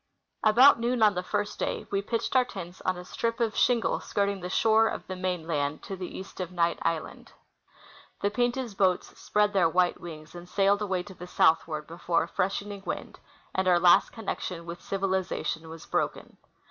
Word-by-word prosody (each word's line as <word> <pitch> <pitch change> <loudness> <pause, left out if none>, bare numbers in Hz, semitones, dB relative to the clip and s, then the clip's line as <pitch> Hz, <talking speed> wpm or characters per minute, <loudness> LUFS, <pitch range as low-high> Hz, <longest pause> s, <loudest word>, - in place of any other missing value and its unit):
About 235 +5 +7
noon 240 0 +1
on 210 -1 +6
the 180 - -2
first 205 +2 -3
day - - -2
we 200 0 +1
pitched 230 +5 -2
our 255 - +6
tents 180 -6 -9
on 185 -1 -1
a 180 - -8
strip 230 +5 -2
of 225 -2 0
shingle 240 -2 +2
skirting 200 -1 -1
the 180 - -5
shore 220 +3 +4
of - - -4
the 185 - -5
mainland 165 -5 -2
to 195 - -5
the 185 -1 -7
east 190 - -9
of 180 -1 -4
Knight 170 -1 +1
island. 165 -1 -3 0.9
The 200 - +1
Pin, 245 +3 +2
ta\s 245 -3 -5
boats 190 -2 +1
spread 210 0 +1
their 180 -4 +4
white 180 +1 +1
wings 155 -2 -9
and 175 0 -10
sailed 200 +2 +2
away 190 -3 -1
to 195 - -11
the 180 0 -10
southward 160 -3 +2
before 170 +1 0
a - - -6
freshening 200 +3 -2
wind, - - -5 0.3
and 190 0 0
our 175 -1 +5
last 175 0 +5
connection 185 -6 -5
with 170 +1 -7
civilization 190 -4 -2
was 165 0 -10
broken. - - -2
190 Hz, 190 wpm, -28 LUFS, 175-210 Hz, 0.9 s, About